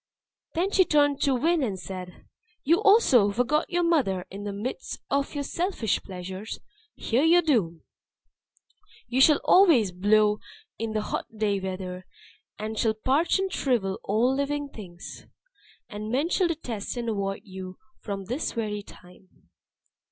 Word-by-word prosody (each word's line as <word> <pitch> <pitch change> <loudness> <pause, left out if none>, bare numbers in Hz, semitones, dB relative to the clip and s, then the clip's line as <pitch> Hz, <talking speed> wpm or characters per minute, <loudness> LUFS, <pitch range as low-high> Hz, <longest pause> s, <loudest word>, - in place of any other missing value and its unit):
Then 365 +4 0
she 380 - +5
turned 290 -4 +2
to 275 -2 +3
Wind 320 +4 +2
and 200 -6 -2
said, 180 -1 -8 0.4
"You 335 +7 +3
also 395 - +5
who 200 - -2
forgot 255 +7 +1
your 350 0 +1
mother 255 - +1
in 200 +2 -7
the 205 - -3
midst 225 - -5
of 280 +2 0
your 285 - -2
selfish 340 - -1
pleasures 190 +2 -7 0.4
hear 245 +3 0
your 345 +2 +5
doom. 195 - 0 1.2
You 250 +2 +1
shall 295 +1 +6
always 315 - +5
blow 210 +3 +3 0.4
in 225 -1 -3
the 215 - 0
hot - - -3
dry 205 -2 +1
weather, 185 -1 -5 0.5
and 215 +1 -4
shall 220 -1 +2
parch 275 - +2
and 385 -1 -2
shrivel 210 -8 0
all 235 +6 +2
living 285 +1 -2
things. 180 -8 -10 0.6
And 215 +1 -6
men 280 +7 +1
shall 365 0 +2
detest 250 -10 -4
and 235 -1 -3
avoid 200 -3 -2
you 185 -2 -9 0.2
from 195 -2 -5
this 250 - -3
very 210 -2 -3
time." 180 - -18
225 Hz, 150 wpm, -26 LUFS, 195-290 Hz, 1.2 s, shall